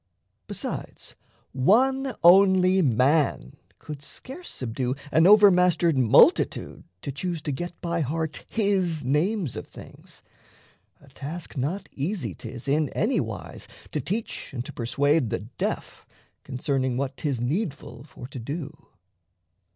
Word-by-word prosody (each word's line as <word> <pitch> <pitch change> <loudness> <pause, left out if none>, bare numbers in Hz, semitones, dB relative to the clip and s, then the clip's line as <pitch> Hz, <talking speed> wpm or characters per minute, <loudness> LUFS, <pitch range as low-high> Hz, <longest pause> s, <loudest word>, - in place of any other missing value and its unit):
Besides, - - -6 0.4
one 260 - +2
only 190 +1 +6
man 130 - +1 0.2
could 150 -2 -9
scarce 270 - -7
subdue 125 +1 -3 0.2
An 160 +2 +5
overmastered 180 -5 +5
multitude 125 -4 +3 0.2
to 140 - -3
choose 170 +4 -3
To 150 - -2
get 175 +5 -5
by 170 -1 -1
heart 160 +2 -3
his 190 - 0
names 155 - 0
of - - -6
things. - - -14 0.8
A 140 - -18
task 150 +5 -7
Not 150 +9 -2
easy 170 +7 -3
'tis 125 +1 -7
in 145 +1 +2
any 235 +6 +1
wise - - -5 0.2
to - - -2
teach 220 +4 -4
And 120 0 -4
to - - -8
persuade 140 +3 +1
the - - -2 0.2
deaf - - -4 0.4
concerning 130 -1 -1
what 135 0 -2
'Tis 140 -6 -2
needful 145 - -3
for 135 - -11
to 135 - -7
do. 145 +5 -5
155 Hz, 130 wpm, -25 LUFS, 135-185 Hz, 0.8 s, only